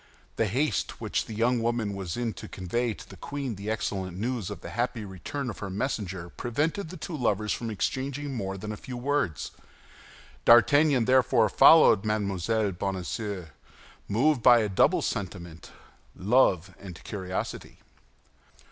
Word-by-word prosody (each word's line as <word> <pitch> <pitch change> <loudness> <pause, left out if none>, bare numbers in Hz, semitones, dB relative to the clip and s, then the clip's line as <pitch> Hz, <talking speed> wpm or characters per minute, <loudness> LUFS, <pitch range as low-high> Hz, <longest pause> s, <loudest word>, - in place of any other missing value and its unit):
The 115 - +1
haste 125 - -1
which - - -1
the 110 - -7
young 120 +2 +2
woman 115 -3 -1
was 95 -2 -5
in 120 -2 -2
to - - -9
convey 110 +5 -2
to - - -12
the 95 - -12
queen 140 +3 -4
the 100 +1 -6
excellent 95 -4 -3
news 115 -2 -2
of 105 - -7
the 85 - -8
happy 120 +1 -2
return 100 +9 -5
of 115 - -6
her 100 - -5
messenger 95 -5 -3
prevented 155 - -2
the 185 - -8
two 175 - -6
lovers 105 -5 0
from 115 - -4
exchanging 135 +6 -3
more 95 -5 -3
than 105 +3 -6
a 105 - -5
few 125 +1 -8
words. 130 - -1 0.9
D'Artagnan 135 +2 +5
therefore 125 -4 +4
followed 150 -5 +7
Mme. 105 -2 -1 0.4
Bonacieux 95 0 -4 0.6
moved 130 +5 +2
by 120 0 +7
a 105 - -1
double 95 - +3
sentiment—love 95 +2 -2
and 90 -4 -10
curiosity. 95 -3 -5
110 Hz, 145 wpm, -27 LUFS, 95-125 Hz, 0.9 s, followed